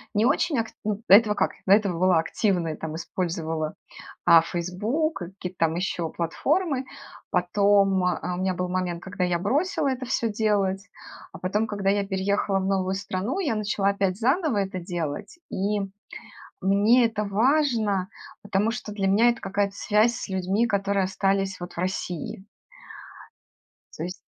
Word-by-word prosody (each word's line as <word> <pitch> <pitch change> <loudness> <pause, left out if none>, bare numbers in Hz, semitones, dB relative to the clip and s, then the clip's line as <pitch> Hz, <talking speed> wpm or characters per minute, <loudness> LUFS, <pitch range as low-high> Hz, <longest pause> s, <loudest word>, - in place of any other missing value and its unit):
не 210 +2 +3
очень 285 +2 +2
акт 225 -1 -2
м 210 +1 -2
до - - +6
этого 210 0 +7
как - - +1 0.2
до 190 - +7
этого 200 -5 +2
была 185 -1 +4
активной, 165 -1 0
там 160 0 -6
использовала, 160 -2 -3 0.5
а, 170 -2 +8
"Фейсбук", 200 - -2
к 175 - -5
какие-то 180 -2 -7
там 165 -1 +2
ещё 175 -2 -2
платформы. 275 - -1 0.4
Потом, 195 +1 +3
э, 180 -1 +1
а 180 - -3
у - - -6
меня 185 0 0
был 180 +1 -2
момент, 180 -1 -2
когда 190 -1 -3
я 180 -1 +1
бросила 290 - 0
это 260 -1 -3
всё 240 -2 0
делать, 200 -3 0 0.4
а - - -8
потом, 210 +4 -1
когда 205 -2 -1
я 200 0 +1
переехала 195 0 0
в 190 - -2
новую 190 -1 0
страну, 195 - -3
я 310 -11 0
начала 205 -2 0
опять 195 -2 0
заново 275 - +1
это 190 -2 -1
делать. 175 - -5
И 205 +2 0 0.8
мне 205 +6 +4
это 220 -2 -2
важно, 220 -3 +1 0.3
потому 205 +2 0
что 235 -2 -5
для 200 -2 -1
меня 210 +5 +4
это 235 - -4
какая-то 200 +1 -1
связь 215 +4 +2
с - - -6
людьми, 190 +4 +1
которые 200 -2 +1
остались 195 0 0
вот 175 0 -7
в - - -10
России. 185 +1 -4 1.5
То 160 - -4
есть 180 +2 -4
195 Hz, 165 wpm, -25 LUFS, 180-215 Hz, 1.5 s, а